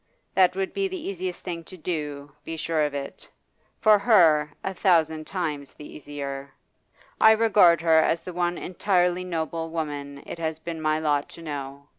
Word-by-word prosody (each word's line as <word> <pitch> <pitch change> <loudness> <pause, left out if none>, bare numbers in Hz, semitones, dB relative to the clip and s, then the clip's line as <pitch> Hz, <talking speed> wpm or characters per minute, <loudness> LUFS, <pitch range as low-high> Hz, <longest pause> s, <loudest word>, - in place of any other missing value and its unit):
That 185 -1 +4
would 190 0 -2
be 395 -1 0
the 380 0 -5
easier 185 -1 -3
thing 175 -1 -7
to 185 - -11
do, 150 -4 -4
be 165 +1 -6
sure 160 -1 0
of 145 -1 -4
it 140 -1 -7 0.5
for 215 -1 +5
her, 165 -9 +4
a 190 - -2
thousand 160 -5 +2
times 150 -7 -4
the 150 - -11
easier. 140 -2 -7 0.6
I 220 - +8
regard 200 -7 +5
her 165 -1 +5
as 165 +1 +1
the 180 - -7
one 175 0 -1
entirely 180 -1 0
noble 165 -2 -3
woman 145 -3 -5
it - - -7
has 160 -1 -2
been 160 0 -6
my 155 0 +1
lot 150 -2 0
to 165 - -12
know. 140 -2 -6
165 Hz, 175 wpm, -25 LUFS, 150-180 Hz, 0.6 s, I